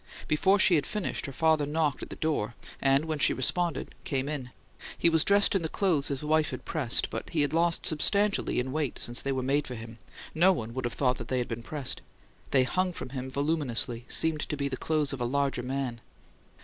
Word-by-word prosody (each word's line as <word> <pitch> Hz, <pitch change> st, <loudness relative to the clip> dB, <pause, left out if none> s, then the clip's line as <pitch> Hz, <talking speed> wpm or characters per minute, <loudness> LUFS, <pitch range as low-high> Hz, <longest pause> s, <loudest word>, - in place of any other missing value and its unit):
Before 190 Hz, +6 st, +3 dB
she 190 Hz, -2 st, +5 dB
had 150 Hz, -4 st, +2 dB
finished, 210 Hz, -7 st, -2 dB
her -, -, -6 dB
father 155 Hz, 0 st, +2 dB
knocked 150 Hz, -2 st, 0 dB
at -, -, -7 dB
the -, -, -7 dB
door, 130 Hz, -8 st, -2 dB, 0.3 s
and, 135 Hz, +2 st, +3 dB
when 155 Hz, -2 st, -3 dB
she -, -, +4 dB
responded, 170 Hz, +5 st, -1 dB
came 135 Hz, -1 st, -2 dB
in. 140 Hz, -4 st, -4 dB, 0.5 s
He 170 Hz, -, +3 dB
was 160 Hz, -1 st, +4 dB
dressed 200 Hz, 0 st, +4 dB
in 195 Hz, -, +1 dB
the 160 Hz, -, -3 dB
clothes 165 Hz, -8 st, +1 dB
his 140 Hz, 0 st, -3 dB
wife 155 Hz, 0 st, +2 dB
had -, -, -7 dB
pressed; 140 Hz, -8 st, +1 dB
but -, -, -5 dB
he 160 Hz, -, 0 dB
had 145 Hz, 0 st, 0 dB
lost 170 Hz, +1 st, +2 dB
substantially 200 Hz, +6 st, +3 dB
in 130 Hz, +1 st, -3 dB
weight 150 Hz, -2 st, -2 dB
since 120 Hz, +1 st, +1 dB
they 140 Hz, -, -2 dB
were 130 Hz, -1 st, -2 dB
made 140 Hz, +3 st, 0 dB
for 125 Hz, -, -6 dB
him; 115 Hz, 0 st, -10 dB, 0.3 s
no 175 Hz, +4 st, +5 dB
one 115 Hz, -8 st, -5 dB
would 130 Hz, 0 st, -3 dB
have 120 Hz, -, -3 dB
thought 130 Hz, -2 st, +1 dB
that -, -, -7 dB
they 130 Hz, -, -1 dB
had 125 Hz, -, -1 dB
been 115 Hz, 0 st, -5 dB
pressed. 140 Hz, +2 st, -3 dB, 0.5 s
They 130 Hz, -2 st, +4 dB
hung 185 Hz, +7 st, -1 dB
from 130 Hz, -, -7 dB
him 130 Hz, 0 st, -5 dB
voluminously, 130 Hz, -5 st, 0 dB
seeming 160 Hz, -1 st, +4 dB
to 150 Hz, -, -3 dB
be 140 Hz, 0 st, -1 dB
the 135 Hz, -, -3 dB
clothes 150 Hz, 0 st, 0 dB
of 130 Hz, -, -6 dB
a -, -, +1 dB
larger 140 Hz, 0 st, 0 dB
man. 125 Hz, -2 st, -4 dB
145 Hz, 225 wpm, -28 LUFS, 130-160 Hz, 0.5 s, she